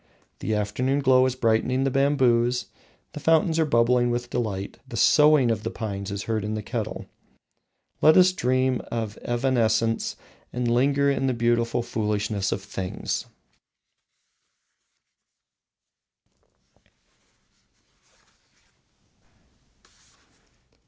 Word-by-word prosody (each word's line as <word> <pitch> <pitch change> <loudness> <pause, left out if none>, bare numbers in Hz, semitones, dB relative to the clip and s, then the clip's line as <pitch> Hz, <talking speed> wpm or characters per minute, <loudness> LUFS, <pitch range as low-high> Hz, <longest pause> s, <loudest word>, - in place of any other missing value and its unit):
The 110 - -2
afternoon 125 +7 -1
glow 130 -1 +4
is 130 - -3
brightening 125 +2 +1
the 135 - 0
bamboos, 125 -3 +2 0.5
the - - -7
fountains 160 +1 +2
are 160 - +3
bubbling 120 -1 +2
with 120 0 -3
delight, 100 -5 -4
the - - -7
soughing 150 -5 +5
of 110 -2 -2
the - - -3
pines 100 -3 -5
is 100 0 -4
heard 110 -2 -2
in 105 +1 -3
our 110 - -3
kettle. - - -5 1.0
Let 155 +3 +6
us 185 0 +5
dream 130 -5 0
of 110 -3 -3
evanescence, 115 -2 0 0.4
and 125 0 -2
linger 140 +4 +2
in 135 -1 -1
the 130 - 0
beautiful 120 0 0
foolishness 105 -3 -2
of 95 - -3
things. 95 -2 -4
120 Hz, 105 wpm, -24 LUFS, 110-130 Hz, 1.0 s, Let